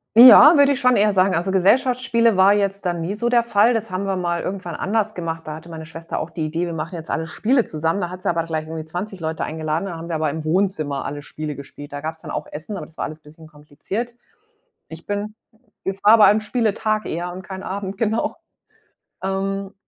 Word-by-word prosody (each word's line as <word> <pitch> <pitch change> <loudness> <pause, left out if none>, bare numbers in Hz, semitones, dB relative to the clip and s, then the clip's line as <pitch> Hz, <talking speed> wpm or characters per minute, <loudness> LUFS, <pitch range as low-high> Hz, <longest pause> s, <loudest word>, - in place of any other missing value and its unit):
Ja, 255 +7 +10
würde 285 0 +5
ich 270 - -4
schon 250 -2 +4
eher 210 +1 +4
sagen. 190 -1 +3
Also 175 +3 0
Gesellschaftsspiele 230 +2 +3
war 190 +2 +6
jetzt 200 -1 -1
da 175 - +1
nie 170 +4 -3
so 235 +3 -1
der 240 -1 +4
Fall. 230 +1 +3
Das 225 -1 -2
haben 185 +1 -3
wir 195 -1 -1
mal 175 -2 -2
irgendwann 185 -3 -5
anders 215 +2 -1
gemacht, 165 -2 -4
da 155 - -5
hatte 160 +2 -12
meine 160 -1 -8
Schwester 165 0 -6
auch - - -4
die 165 -1 -4
Idee, 165 +3 -2
wir 170 - -4
machen 160 +2 -5
jetzt 165 -2 -7
alle 160 - -1
Spiele 240 +8 +1
zusammen. 160 +4 -1
Da 175 -3 -3
hat 185 0 -8
sie - - -1
aber 170 -1 0
gleich 160 -1 -4
irgendwie 160 -1 -6
20 185 +5 -6
Leute 160 0 -3
eingeladen, 155 +2 -2
da 175 -3 -6
haben 165 +1 -8
wir 165 - -2
aber 155 -1 0
im 155 +1 -5
Wohnzimmer 155 -5 0
alle 145 0 -5
Spiele 150 0 -6
gespielt. 145 +1 -11
Da 145 - -5
gab's 160 +1 -5
dann - - -9
auch - - -4
Essen, 160 +7 -6
aber - - -6
das 160 - -20
war - - -1
alles 155 +1 -8
bisschen 155 +1 -15
kompliziert. 155 +10 -6 0.7
Ich 160 +1 -11
bin 205 +1 -3 0.5
es 195 0 -3
war 215 +2 +8
bei 210 - +9
einem 210 +2 +5
Spieletag 215 -1 0
eher 175 +2 -3
und 185 - -7
kein 190 -1 -7
Abend, 195 0 -5
genau. 220 +1 0 0.9
Ähm, 195 +1 -2
185 Hz, 230 wpm, -21 LUFS, 160-205 Hz, 0.9 s, Ja